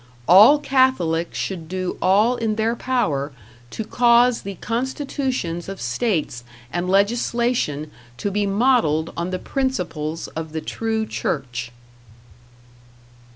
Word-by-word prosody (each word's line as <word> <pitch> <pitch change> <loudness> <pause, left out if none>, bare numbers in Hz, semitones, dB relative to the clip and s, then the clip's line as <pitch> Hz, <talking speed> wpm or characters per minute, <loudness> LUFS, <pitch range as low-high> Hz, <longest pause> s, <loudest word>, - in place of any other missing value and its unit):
All 210 - +8
Catholics 260 - +1
should 170 -5 -4
do 185 0 -3
all 210 +6 +4
in 225 -3 -1
their 225 +2 0
power 155 - -1 0.4
to 220 - -5
cause 240 +1 +4
the 195 0 -6
constitutions 250 - -3
of 195 - -7
states 150 - -1 0.3
and 175 +1 -1
legislation 200 - +1 0.3
to 200 - -2
be 205 +1 0
modeled 195 - +2
on 170 +2 -3
the 185 - -2
principles 175 - -3
of 160 -1 -6
the 160 - -3
true 220 +3 -2
Church. 125 - -3
200 Hz, 115 wpm, -22 LUFS, 165-240 Hz, 0.4 s, All